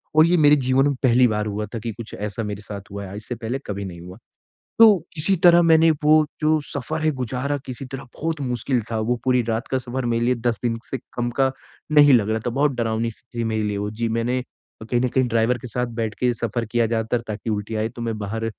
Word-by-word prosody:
और 155 0 +7
ये 175 +1 +3
मेरे 150 -2 +6
जीवन 130 0 +2
में 145 - +1
पहली 125 0 +5
बार 105 -2 -1
हुआ 105 +1 -3
था 115 - -3
कि 115 +1 -4
कुछ 115 +1 -10
ऐसा 105 +2 -4
मेरे 105 -1 -5
साथ 100 -1 -7
हुआ 100 0 -5
है, 95 +1 -8
इससे 110 +3 -6
पहले 120 +3 -4
कभी 100 -1 -4
नहीं 85 -3 -8
हुआ। 90 +2 -10 0.6
तो 215 -4 +8 0.2
किसी 170 +4 +1
तरह 175 0 +8
मैंने 165 -1 +5
वो 155 0 +5
जो 155 0 +3
सफर 155 +3 -4
है 155 - +3
गुज़ारा, 130 +4 -2
किसी 130 +1 -6
तरह 135 +1 -7
बहुत 160 -1 -3
मुश्किल 125 -1 -1
था 115 - -1
वो 120 +3 0
पूरी 125 -1 +3
रात 115 +1 -2
का 130 - +2
सफर 130 +1 -4
मेरे 115 0 +1
लिए 125 - +3
10 115 -3 +1
दिन 115 -1 0
से 135 - -2 0.2
कम 120 0 -1
का 135 0 +4 0.4
नहीं 145 -1 +7
लग 110 -3 +3
रहा 110 0 0
था - - +1
बहुत 140 +4 +1
डरावनी-सी 115 0 -3
थी - - 0
मेरे 110 -1 -1
लिए 105 -1 -1
वो। 105 +1 -3
जी, 115 +2 -2
मैंने 115 +3 -1 0.4
कहीं 120 +2 0
न 130 - +1
कहीं 130 +1 +1
ड्राइवर 115 +2 +1
के 125 +2 -9
साथ 125 +2 -2
बैठ 110 -2 -2
के 125 -1 +3
सफर 115 +1 -2
किया 120 -1 +3
ज़्यादातर 115 +1 -1
ताकि 110 +1 -4
उल्टी 105 +1 -3
आए 110 +1 0
तो 120 - -9
मैं 115 -2 -3
बाहर 110 +2 -4
120 Hz, 245 wpm, -22 LUFS, 110-130 Hz, 0.6 s, तो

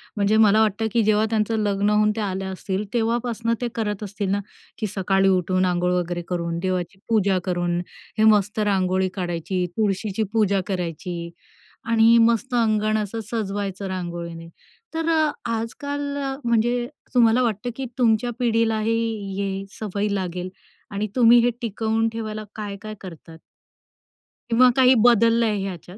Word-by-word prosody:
म्हणजे 210 +1 +2
मला 215 0 +5
वाटतं, 220 +1 +1
की 235 - +3
जेव्हा 215 +1 +3
त्यांचं 220 0 0
लग्न 205 0 +1
होऊन 210 0 +3
त्या 215 -2 -1
आल्या 190 0 -3
असतील, 190 +2 -3
तेव्हापासनं 230 0 0
ते 245 - 0
करत 210 -2 -2
असतील 200 -1 -4
ना? 200 - +1 0.4
की 215 - -2
सकाळी 195 0 +2
उठून 185 0 +2
अंघोळ 180 0 +1
वगैरे 175 -1 -1
करून, 170 -1 -2
देवाची 185 0 -3
पूजा 200 -4 +2
करून, 175 -1 -1 0.4
हे 215 - +3
मस्त 205 +2 -1
रांगोळी 190 -2 +1
काढायची, 180 0 -2
तुळशीची 210 0 0
पूजा 200 -3 +2
करायची 170 -2 -4 0.6
आणि 230 +1 +6
मस्त 235 +2 +2
अंगण 215 -2 +2
असं 215 +2 -3
सजवायचं 200 -3 -3
रांगोळीने. 170 -2 -5 0.5
तर 325 0 -2
अ, 315 -2 +3 0.2
आजकाल 285 +6 -3 0.2
अ, 270 -1 -2
म्हणजे 240 +1 +1 0.3
तुम्हाला 240 0 +4
वाटतं, 230 +1 -1
की 270 - -4
तुमच्या 240 0 +2
पिढीलाही 225 -2 +1 0.4
ही 195 0 -3
सवय 210 -1 -2
लागेल 185 -2 -3 0.4
आणि 205 +2 -2
तुम्ही 240 -1 +7
हे - - +4
टिकवून 225 0 0
ठेवायला 215 -1 -5
काय-काय 210 0 -6
करतात? 165 -3 -11 1.1
किंवा 250 +2 +6
काही 260 -1 +6
बदललंय 230 -2 +3
ह्याच्यात? 180 +1 -8
210 Hz, 145 wpm, -23 LUFS, 190-225 Hz, 1.1 s, तुम्ही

